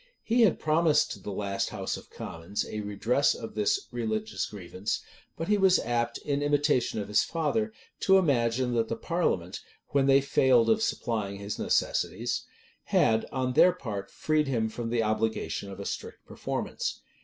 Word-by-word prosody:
He 235 +2 +2
had 215 -7 +5
promised 155 0 +2
to - - -6
the 95 - -7
last 100 0 -2
house - - -3
of - - -11
commons 85 +5 -5
a 105 - -5
redress 105 +7 +1
of 115 - -7
this 105 -1 +1
religious 110 -3 -2
grievance: 95 +1 -4 0.4
but 165 - -3
he 210 -1 +3
was 190 -1 +5
apt, 120 0 -1
in 140 -1 -2
imitation 145 -5 +1
of 100 - -4
his 105 - +3
father, 170 +8 -1 0.3
to 190 0 +5
imagine 125 -7 +2
that 115 -1 +1
the 115 - -2
parliament, 115 - -1 0.3
when 140 -1 +2
they 135 0 +6
failed 130 -3 +4
of 220 0 +2
supplying 110 - -1
his 100 +1 -5
necessities, - - 0 0.4
had, 110 0 +3
on 130 -1 -1
their 180 +7 +6
part, 105 - -5
freed 155 -1 0
him 115 -4 0
from 115 +1 -5
the 115 -1 +1
obligation 110 -2 -1
of 100 0 -9
a 100 - -6
strict - - -6
performance. - - -4
120 Hz, 170 wpm, -28 LUFS, 105-145 Hz, 0.4 s, they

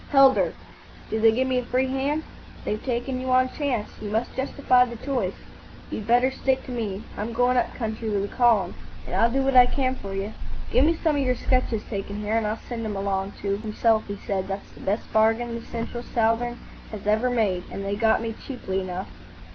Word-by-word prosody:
"Heldar. 275 -2 +6 0.6
Do 220 - 0
they 225 0 +6
give 255 +4 +1
me 255 -1 +2
a - - -3
free 255 +2 +1
hand?" 275 +4 -1 0.4
"They've 215 - -2
taken 255 +1 -2
you 260 - -3
on 255 0 +4
chance. 255 -8 -1
You 210 - -4
must 220 +3 -1
justify 260 -1 +3
the 235 -1 -5
choice. 260 +2 -2 0.6
You'd 210 - -4
better 245 +3 +4
stick 265 0 0
to - - -7
me. 215 -4 -3
I'm 215 +3 -4
going 245 +2 +3
up 245 - +1
country 225 -1 -3
with 200 -1 0
a - - -10
column, 225 -7 +4 0.3
and - - -4
I'll 230 +5 +4
do 270 +3 +1
what 270 0 +1
I 250 -1 +9
can 260 0 0
for 195 -6 -7
you. 200 +3 -3 0.4
Give 265 - +5
me 330 +2 +3
some 315 -2 +1
of - - +2
your 255 -2 +2
sketches 250 -4 0
taken 205 0 -5
here, 210 +1 -1
and 225 -2 +1
I'll 215 +1 -1
send 235 -2 -4
'em 215 -2 -3
along." 195 0 -1
To 200 0 0
himself 220 +1 +1
he 200 - -4
said, 195 -1 -2
"That's 195 0 -5
the - - -15
best 205 +4 -1
bargain 225 +2 +3
the 235 - -4
Central 235 +1 -4
southern 240 +1 0 0.3
has 210 -2 -8
ever 215 +4 +2
made; 205 -7 +1
and 195 - -5
they 200 +1 -1
got 220 +1 +3
me 225 -1 -2
cheaply 195 -8 -3
enough." 185 +1 -5
230 Hz, 220 wpm, -25 LUFS, 210-255 Hz, 0.6 s, I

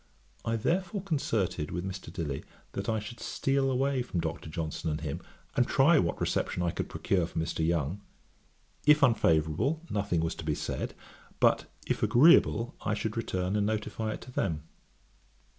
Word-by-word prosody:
I 115 0 0
therefore 185 - 0
concerted 115 - -1
with 90 +2 -3
Mr. 95 -3 -6
Dilly, 80 -6 -3 0.3
that - - -3
I 110 - +2
should 110 +3 -6
steal 135 0 0
away 135 0 +1
from 120 -8 -3
Dr. 80 -1 -3
Johnson 80 0 -3
and 75 0 -1
him, 75 -3 -4 0.3
and 125 - +3
try 145 +4 +5
what 85 - 0
reception 90 - 0
I 85 - +1
could - - -4
procure 90 -4 0
from 80 - -2
Mr. 80 0 -2
Young; 85 +3 0 0.9
if 150 -1 +7
unfavourable, 110 - +3
nothing 100 -5 0
was 80 0 -1
to - - -6
be 75 -1 0
said; - - -3 0.4
but - - +3 0.2
if - - -1
agreeable, 120 -1 +5
I 105 - 0
should 110 +2 -3
return 95 -4 -1
and 105 -1 +2
notify 110 0 -2
it - - -8
to 125 - -10
them. 80 -10 -1
105 Hz, 170 wpm, -30 LUFS, 85-125 Hz, 0.9 s, if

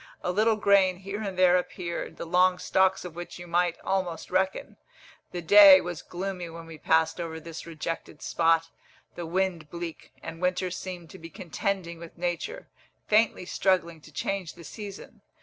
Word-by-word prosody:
A 180 - 0
little 215 +4 +3
grain 200 -3 +4
here 195 +3 -6
and 195 -3 -4
there 180 -1 +6
appeared, 175 -1 -4
the - - -5
long 180 +2 +3
stalks 190 0 +2
of 175 - -7
which 175 0 -7
you 175 - -9
might 175 0 +1
almost 185 -4 -2
reckon. 190 +1 -1 0.5
The 175 -1 -5
day 195 +2 +9
was 175 -2 -5
gloomy 180 -1 -5
when 165 0 -9
we 165 -1 -11
passed 160 +2 +2
over 160 -1 -5
this 165 +1 -9
rejected 165 -1 -5
spot, 165 0 +2 0.4
the 170 -1 -6
wind 175 -3 -1
bleak, 170 -1 -7
and 165 - -7
winter 180 0 0
seemed 180 -2 -7
to 190 - -11
be 165 - -9
contending 185 -2 -3
with 170 0 -11
nature, 175 -1 -3 0.4
faintly 215 -3 +2
struggling 175 -4 0
to 155 - -15
change 185 +4 -3
the 170 - -12
season. 200 +3 -9
180 Hz, 170 wpm, -27 LUFS, 165-190 Hz, 0.5 s, day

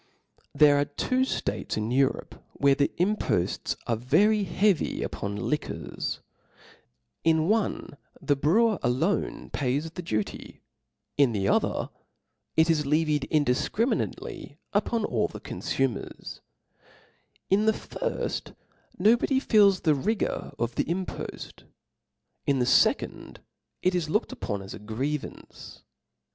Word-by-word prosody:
There 145 0 +6
are 145 - +2
two 255 - -1 0.3
Hates - - -2
in 110 +2 -2
Europe 135 +1 0
where 140 0 +3
the 140 +1 +1
impofts 180 - 0
are 115 - +1
very 195 - +3
heavy 195 -1 +1
upon 100 0 -4
liquors; 150 +8 -3 1.0
in 160 -1 +3
one 215 -8 -1 0.2
the 145 - +1
brewer 205 +11 +3
alone 145 +10 -1
pays 145 +4 -1
the 180 - -6
duty, 110 - -4 0.6
in 140 -5 +4
the 100 -2 0
other - - +1 0.7
it 160 +1 +5
is 160 -2 +2
levied 150 -1 +1
indifcriminately 155 - -1 0.2
upon 230 -2 +1
all 115 - 0
the - - -9
confumers: 135 -6 -3 1.1
in 210 +3 +3
the - - +7
firft - - -4 0.4
no 215 +6 +5
body 265 +2 +1
feels 205 -7 +4
the 155 - +3
rigor 205 +10 -1
of 120 0 -1
the - - 0
impoft, 180 +3 -5 0.8
in 140 - +3
the 125 - +2
fecond 125 - +2 0.5
it 185 - +3
is 170 -4 -1
looked 210 +11 0
upon 105 - -4
as 95 - -9
a - - -8
grievance. 130 +8 -5
150 Hz, 125 wpm, -27 LUFS, 130-195 Hz, 1.1 s, the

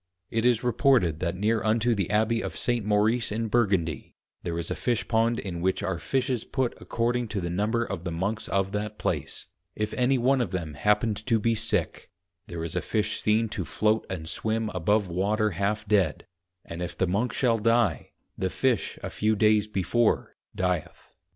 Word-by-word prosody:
It 115 +1 0
is 120 -1 +3
reported 120 - +3
that 85 0 -1
near 110 +4 +1
unto 115 +2 +2
the 100 -5 -1
Abby 110 +2 +2
of - - -5
St. 120 -2 0
Maurice 105 +3 +2
in 110 +1 -2
Burgundy 95 - 0 0.3
there 85 -1 -3
is 85 +1 -3
a - - -1
Fishpond 115 +4 +1
in 85 -3 -5
which 95 +2 0
are 95 -3 -2
Fishes 130 -1 -1
put 130 -3 -1
according 120 +1 -1
to 105 -2 -3
the 85 -2 -3
number 110 +6 0
of 95 -6 -5
the 90 - -3
Monks 100 +7 -2
of 95 0 0
that 105 +1 -3
place; - - -3 0.3
if 105 0 -2
any 130 +1 +2
one 130 +2 +3
of 120 - -1
them 85 -5 -4
happened 105 +6 +1
to 115 -3 +4
be 115 +2 +2
sick, 110 -5 -1 0.4
there 85 -1 -5
is 85 - -4
a - - +1
Fish 110 -1 -1
seen 110 +1 +2
to 95 - -3
Float 105 +8 0
and 80 -4 -5
Swim 110 +4 -1
above 100 +3 +1
Water 105 +5 0
half 100 +4 -1
dead, 100 -8 +2 0.4
and 85 +1 -7
if 90 - -5
the 95 - +2
Monk 105 +7 0
shall 115 -1 +1
die, 115 -6 +2 0.3
the 95 - -1
Fish 125 +2 0
a - - -3
few 110 +1 +1
days 105 0 +3
before 105 +3 0 0.2
dieth. 90 -3 -3
105 Hz, 190 wpm, -27 LUFS, 95-115 Hz, 0.4 s, to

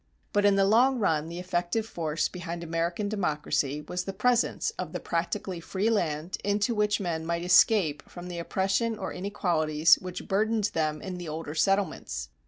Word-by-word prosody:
But 205 0 +3
in 200 -1 +5
the 195 0 +4
long 245 +6 +4
run 160 -8 +1
the 170 - -6
effective 180 +4 -1
force 165 -6 -1
behind 175 -1 -6
American 170 +4 -1
democracy 150 -7 -1
was 180 +4 -4
the 195 - -4
presence 240 - +1
of - - -4
the - - -3
practically 175 +2 -2
free 195 +6 -1
land 165 -4 -1
into 205 +3 +1
which 210 -1 +1
men 170 -4 -2
might 170 +1 -2
escape 180 -4 +4
from 180 0 -8
oppression 195 +6 -1
or 190 - -4
inequalities 165 -5 +2
which 185 -1 -7
burdened 215 +1 +1
them 155 -1 -1
in 185 -2 -5
the 175 -3 -6
older 155 -1 -5
settlements. 160 - 0
180 Hz, 170 wpm, -28 LUFS, 165-205 Hz, -, in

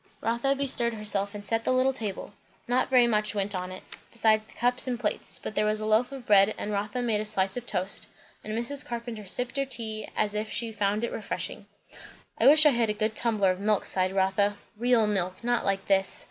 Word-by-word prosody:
Rotha 235 +5 0
bestirred 245 -4 0
herself 205 -1 -1
and 205 0 -7
set 225 +1 0
the - - 0
little 255 +1 +2
table. 210 -4 -6 0.3
Not 245 +1 +1
very 250 -2 +5
much 215 -2 0
went 200 0 -2
on 185 0 -4
it, 185 - -9 0.3
besides 220 -2 +2
the - - -17
cups 245 +2 +2
and 245 -2 -2
plates; 215 -4 0
but - - -7
there 210 0 +1
was 215 0 0
a 215 - -4
loaf 220 +4 +2
of 270 -3 -9
bread, 205 0 +4
and 210 - -4
Rotha 210 +4 -2
made 220 -3 0
a - - -2
slice 195 -3 0
of 245 0 -6
toast; 185 +2 -1 0.4
and 215 +1 -3
Mrs. 250 +4 +3
Carpenter 235 -3 -6
sipped 250 +7 +1
her 275 - +2
tea 220 -5 -4
as 210 -1 0
if 210 +1 -3
she 230 -1 -3
found 210 0 -1
it 235 - -2
refreshing. 210 - -5 0.7
"I - - +4
wish 305 +2 +7
I 300 - +7
had 235 -3 +1
a - - +1
good 215 +1 -2
tumbler 215 -6 +2
of 185 - -4
milk," 210 0 +1
sighed 185 0 +1
Rotha; 195 +2 +1 0.2
"real 235 0 +2
milk, 190 -1 -2
not 240 0 0
like 195 -1 -1
this. 195 -1 +1
215 Hz, 225 wpm, -27 LUFS, 205-240 Hz, 0.7 s, wish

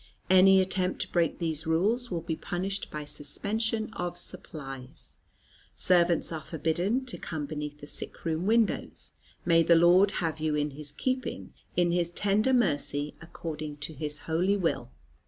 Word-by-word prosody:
Any 190 +1 +8
attempt 185 0 -1
to - - -13
break 170 -3 +1
these 160 -2 -2
rules 215 +10 +1
will 170 -3 -2
be 160 - -2
punished 190 +4 -3
by 150 -1 -5
suspension 220 +10 -1
of 175 -3 -3
supplies. 135 -4 -6 0.6
Servants 175 -2 +3
are 160 -2 -4
forbidden 175 - 0
to 245 - -6
come 155 -3 -4
beneath 150 0 -5
the - - -7
sick - - -5
room 165 +3 -1
windows. 225 0 +1 0.3
May 165 -1 +5
the 170 +1 +5
Lord 175 +4 +6
have 160 -5 -2
you 155 -1 0
in 150 0 0
His 145 +1 -6
keeping, 255 - -3 0.2
in 175 -1 +3
His 175 -1 +1
tender 205 +7 +1
mercy, 150 - +1
according 155 -3 -6
to 160 - -8
His 150 0 -4
holy 180 +5 +2
will. 165 -10 -1
170 Hz, 155 wpm, -29 LUFS, 150-195 Hz, 0.6 s, Any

